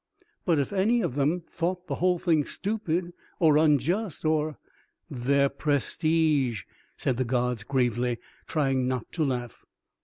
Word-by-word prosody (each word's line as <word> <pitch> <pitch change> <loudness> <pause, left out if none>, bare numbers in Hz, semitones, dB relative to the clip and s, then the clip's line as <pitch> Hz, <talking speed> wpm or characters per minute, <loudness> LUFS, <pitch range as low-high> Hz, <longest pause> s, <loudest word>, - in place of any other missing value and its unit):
"But 170 -4 +3
if 140 +6 -1
any 220 +5 +3
of 125 - -1
them 150 +6 0
thought 180 +2 -2
the - - -4
whole 180 0 +3
thing 165 -4 +2
stupid 180 -2 -2 0.3
or 155 -4 +5
unjust 160 - +1
or 155 -1 +1 0.3
" - - -49 0.2
"Their 140 0 +4
prestige," 145 - +1 0.3
said 125 - 0
the 130 - +1
gods 125 -2 0
gravely, 120 0 0 0.3
trying 135 -4 +1
not 130 -2 -3
to 165 - -1
laugh. 125 -4 -3
150 Hz, 145 wpm, -27 LUFS, 130-170 Hz, 0.3 s, or